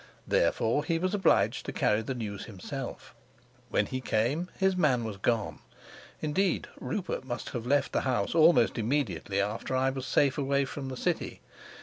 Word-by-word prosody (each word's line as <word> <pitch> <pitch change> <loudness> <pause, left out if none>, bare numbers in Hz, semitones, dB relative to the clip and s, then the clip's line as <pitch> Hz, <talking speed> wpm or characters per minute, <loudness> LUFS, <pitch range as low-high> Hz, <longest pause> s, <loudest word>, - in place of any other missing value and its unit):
Therefore 115 +6 +2
he 165 0 0
was 185 +3 -1
obliged 195 -5 +3
to - - -2
carry 105 +1 +2
the 130 +4 -4
news 105 -4 -5
himself; 95 -5 -7 0.6
when 105 - +2
he 130 +4 -4
came 130 +10 0
his 190 -1 +2
man 140 -9 +2
was 110 -3 -5
gone. 110 +1 0 0.6
Indeed 180 +4 +1
Rupert 185 - -3
must 120 -2 -5
have 120 -3 -5
left 145 +2 +2
the - - +2
house 125 -7 0
almost 165 -5 +5
immediately 115 -5 -1
after 105 +6 -1
I 130 +1 +2
was 130 -1 -5
safe 140 -1 +2
away 140 0 +1
from 135 0 -6
the 130 - -5
city. - - -2
130 Hz, 165 wpm, -29 LUFS, 115-150 Hz, 0.6 s, almost